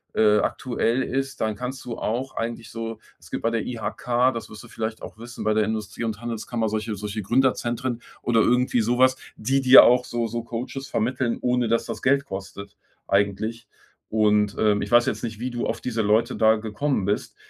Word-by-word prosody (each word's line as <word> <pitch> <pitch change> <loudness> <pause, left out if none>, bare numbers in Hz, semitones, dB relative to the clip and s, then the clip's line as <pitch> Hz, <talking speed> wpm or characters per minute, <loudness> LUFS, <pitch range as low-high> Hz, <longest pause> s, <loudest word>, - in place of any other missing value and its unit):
äh, 105 -1 +5
aktuell 125 -1 0
ist, 135 +1 -3
dann 110 -1 0
kannst 125 +4 -5
du 120 -2 -5
auch 125 +4 -3
eigentlich 115 0 -4
so 115 -1 -6 0.2
es - - -18
gibt - - -3
bei 115 - +1
der 115 -1 -2
IHK, 125 +2 0
das 115 -2 -6
wirst 105 - -11
du - - -12
vielleicht 110 -1 -5
auch - - -9
wissen, 120 +1 -8
bei 110 0 +1
der 110 - +3
Industrie 110 +1 -4
und 110 -1 -3
Handelskammer 115 -1 -2
solche 110 +1 -2
solche 105 +1 -5
Gründerzentren 120 +1 0 0.2
oder 115 -2 +2
irgendwie 125 0 +2
sowas, 130 +3 +3 0.2
die 135 +5 +1
dir 130 0 +9
auch 125 0 +4
so 120 -1 -2
so 115 +1 -4
Coaches 125 +3 -5
vermitteln, 120 +1 -1
ohne 125 -1 +1
dass 115 +1 +1
das - - -6
Geld 140 +1 +3
kostet. 100 -2 -8 0.3
Eigentlich. 105 +3 0 0.4
Und, 105 -1 +2
ähm, 105 -1 +3
ich - - -6
weiß 120 0 +5
jetzt 105 - -2
nicht, 110 -2 -5
wie 125 +2 -2
du 120 -1 -3
auf 115 - -3
diese 115 -3 -1
Leute 105 +2 +2
da 110 0 +4
gekommen 110 +1 -1
bist. 105 - -2
115 Hz, 200 wpm, -24 LUFS, 110-125 Hz, 0.4 s, dir